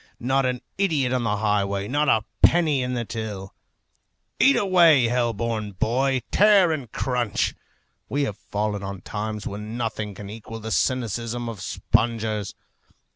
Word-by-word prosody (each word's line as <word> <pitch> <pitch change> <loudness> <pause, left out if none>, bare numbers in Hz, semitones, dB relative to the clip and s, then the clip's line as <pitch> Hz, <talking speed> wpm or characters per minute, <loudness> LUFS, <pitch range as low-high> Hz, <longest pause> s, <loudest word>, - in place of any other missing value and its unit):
Not 130 +2 +1
an 125 -1 -2 0.2
idiot 150 -10 +1
on 125 -1 0
the 105 -2 0
highway, 100 -1 0
not 145 +5 +1
a 110 -1 +3 0.2
penny 155 -6 +4
in 125 0 -2
the 120 -1 -2
till. 105 -4 -6 0.9
Eat 275 - +6
away, 170 -8 +5
hell 120 -1 +1
born 110 -2 -3
boy! 130 +6 0
Tear 200 -4 +5
and 135 -8 -4
crunch! 120 -5 -1 0.6
We 145 +1 0
have 105 -8 -3
fallen 105 -1 -1
on 100 -1 -6
times 105 +2 -5
when 105 +3 -5
nothing 110 -3 -3
can 100 +1 -8
equal 115 +2 -8
the 110 0 -6
cynicism 120 -1 -1
of 110 -4 -6
spongers. 110 -3 -1
115 Hz, 150 wpm, -24 LUFS, 105-130 Hz, 0.9 s, Eat